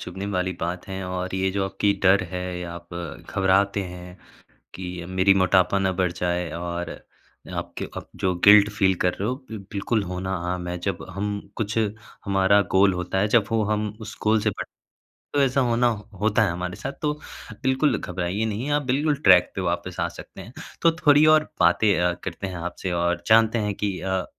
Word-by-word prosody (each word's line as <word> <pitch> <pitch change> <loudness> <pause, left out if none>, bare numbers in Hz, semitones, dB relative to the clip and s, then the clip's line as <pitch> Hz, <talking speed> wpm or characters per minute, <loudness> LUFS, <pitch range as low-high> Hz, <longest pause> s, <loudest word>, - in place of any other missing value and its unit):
चुभने 95 +2 -6
वाली 90 0 0
बात 90 +1 -3
है 95 0 -5
और 90 0 -3
ये 95 0 0
जो 95 0 -1
आपकी 95 +1 +1
डर 95 +1 +5
है 90 -1 -4 0.2
या 85 -1 -6
आप 85 0 -10 0.4
घबराते 100 +1 +2
हैं 90 0 -9 0.6
कि 90 -2 -6
मेरी 95 +1 +3
मोटापा 95 0 +3
ना 95 -1 +1
बढ़ 90 -2 +1
जाए 90 -1 -2
और 85 0 -4 0.6
आपके - - -5
अप - - -7
जो 90 -1 +1
गिल्ट 105 0 +8
फ़ील 95 -2 +2
कर 90 - +3
रहे 100 +4 -3
हो, 125 - 0
बिल 110 -1 -6
बिल्कुल 105 +2 0
होना 90 +1 -4 0.2
आम 90 -1 -4
है। 90 - -3
जब 85 - -3
हम 100 +1 -3 0.2
कुछ 110 0 -2 0.5
हमारा 100 0 +4
गोल 95 0 +5
होता 90 +1 -2
है, 105 - +2
जब 110 0 +4
वो 115 -1 +2
हम 105 0 0
उस 110 -1 -8
गोल 110 0 +3
से 105 - +2 0.9
तो 145 - +4
ऐसा 135 0 +2
होना 120 0 +2 0.3
होता 110 +1 +3
है 95 - +1
हमारे 90 +1 -4
साथ, - - -5
तो 150 -1 +1 0.5
बिल्कुल, 130 -1 +2
घबराइए 90 +4 -2
नहीं, 110 +6 -3
आप 145 0 +2
बिल्कुल 145 +4 +1
ट्रैक 90 -1 +6
पे 95 - -2
वापिस 85 -1 -3
आ - - +1
सकते - - -11
हैं। - - -12 0.3
तो 165 - +5
थोड़ी 145 +1 +7
और 155 0 0
बातें 95 +4 +4
अ, 90 0 +2
करते 95 +1 -5
हैं 95 - -6
आपसे 90 +2 -4
और 85 0 0
जानते 110 +1 +5
हैं 100 - -1
कि 100 -2 -2
अ, 95 -1 -1
95 Hz, 195 wpm, -24 LUFS, 90-105 Hz, 0.9 s, गिल्ट